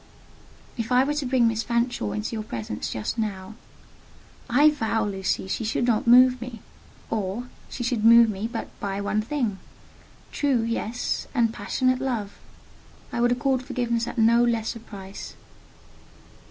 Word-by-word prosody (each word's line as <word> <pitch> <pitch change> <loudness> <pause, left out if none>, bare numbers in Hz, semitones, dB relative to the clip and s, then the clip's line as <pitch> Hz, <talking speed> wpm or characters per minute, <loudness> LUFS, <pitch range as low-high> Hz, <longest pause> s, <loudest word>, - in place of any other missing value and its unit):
"If 230 +1 -4
I 250 +1 +5
were 290 +2 0
to 295 -3 -2
bring 250 -2 +3
Miss 225 -1 0
Fanshawe 235 - -1
into 105 - -3
your 220 - -3
presence 110 - -5
just 110 - -3
now?" 200 -2 -3 1.0
"I 290 +6 +6
vow, 225 -6 -1
Lucy, 190 -1 -2
she 210 - -2
should 225 +2 0
not 235 -2 +1
move 250 +1 +6
me: 240 -2 -7 0.5
or, 210 +1 -2 0.3
she 245 - -5
should 240 -2 -1
move 230 +1 +8
me 210 0 -3
but 230 - -4
by 195 -1 -3
one 205 +1 0
thing—true, 245 +1 -3
yes, 230 +1 -2
and 230 -3 +2
passionate 255 +4 0
love. 230 -7 -3 0.7
I 235 - -1
would 240 0 +3
accord 260 +1 +1
forgiveness 240 -3 -1
at - - -6
no 230 +1 +5
less 230 -2 0
a - - -7
price." 195 -3 -10
230 Hz, 155 wpm, -25 LUFS, 210-245 Hz, 1.0 s, move